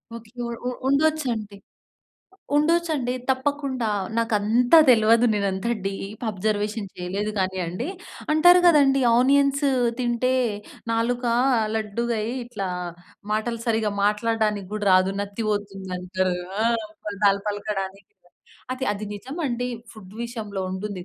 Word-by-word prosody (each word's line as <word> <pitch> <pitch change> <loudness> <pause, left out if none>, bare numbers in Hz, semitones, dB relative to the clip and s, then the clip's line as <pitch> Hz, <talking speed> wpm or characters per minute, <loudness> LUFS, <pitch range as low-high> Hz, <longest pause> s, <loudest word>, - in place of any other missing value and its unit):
Okay. 230 -1 -11 0.4
ఉ - - +1 0.2
ఉండొచ్చండి. 275 -8 +1 1.0
ఉండొచ్చండి 305 -5 +1 0.2
తప్పకుండా. 265 -2 -1 0.3
నాకు 230 0 0
అంత 235 +5 +1 0.2
తెలవదు. 230 0 +5
నేను 200 -1 0
అంత 190 +4 -3 0.2
డీప్ 200 +3 -5
అబ్‌జర్వేషన్ 210 +1 -2
చేయలేదు 195 +4 -3
కానీ 190 0 -1
అండి. 175 - -4 0.4
అంటారు 350 +4 +7
కదండీ. 280 -5 +5 0.2
ఆనియన్స్ 280 +2 +3 0.3
తింటే 245 +1 +1 0.6
నాలుక 240 +2 0 0.5
లడ్డుగయ్యి 225 +2 -2
ఇట్లా 210 -5 -4 0.6
మాటలు 225 +2 -1
సరిగ్గా 220 -2 +1
మాట్లాడడానికి 210 -1 0
కూడా 210 -1 -3
రాదు. 185 +1 +4
నత్తి 205 +2 -4
పోతుంది 195 -2 -3
అంటారు. 185 0 -1 0.3
ఆ! - - +2 0.4
పదాలు 200 -1 +2
పలకడానికి. 200 -2 -4 0.6
అది 255 +1 -3
అది 210 +1 -5
నిజం 260 - -8
అండి. 245 0 -2 0.3
ఫుడ్ 205 -3 -13
విషయంలో 215 -5 -5
ఉంటుంది. 190 0 -5
220 Hz, 115 wpm, -24 LUFS, 200-250 Hz, 1.0 s, అంటారు